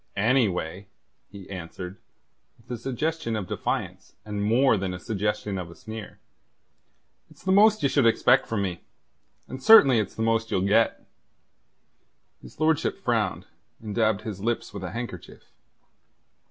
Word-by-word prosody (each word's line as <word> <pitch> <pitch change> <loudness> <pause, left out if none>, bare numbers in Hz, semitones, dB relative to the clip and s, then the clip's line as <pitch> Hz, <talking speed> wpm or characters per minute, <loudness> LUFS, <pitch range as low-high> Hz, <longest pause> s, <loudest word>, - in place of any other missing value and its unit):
"Anyway," 100 -5 0 0.4
he 100 -2 -11
answered, 90 +1 -7 0.6
with 120 +2 -16
a 120 -2 -5
suggestion 135 -1 -2
of 105 -3 -3
defiance - - -4
and 105 -1 -3
more 120 +4 +4
than 95 -2 -3
a - - -8
suggestion 105 -2 -2
of 90 -2 -6
a 85 - -12
sneer, 110 -1 -9 1.1
"it's - - -19
the 190 - 0
most 215 +1 +5
ye - - +5
should 135 -3 +3
expect 115 - +3
from 110 -3 -1
me, 90 -3 -4 0.7
and 130 +1 -8
certainly 135 - +7
it's 105 - -3
the 110 - -2
most 115 0 +1
ye'll 95 - 0
get." 110 +3 +2 1.4
His - - -15
lordship 155 -1 +1
frowned, - - -1 0.3
and 105 -2 -7
dabbed 110 -2 +1
his 110 -3 -6
lips 115 +2 -2
with 100 -2 -7
a 90 - -4
handkerchief. 105 -3 -8
110 Hz, 150 wpm, -25 LUFS, 100-125 Hz, 1.4 s, certainly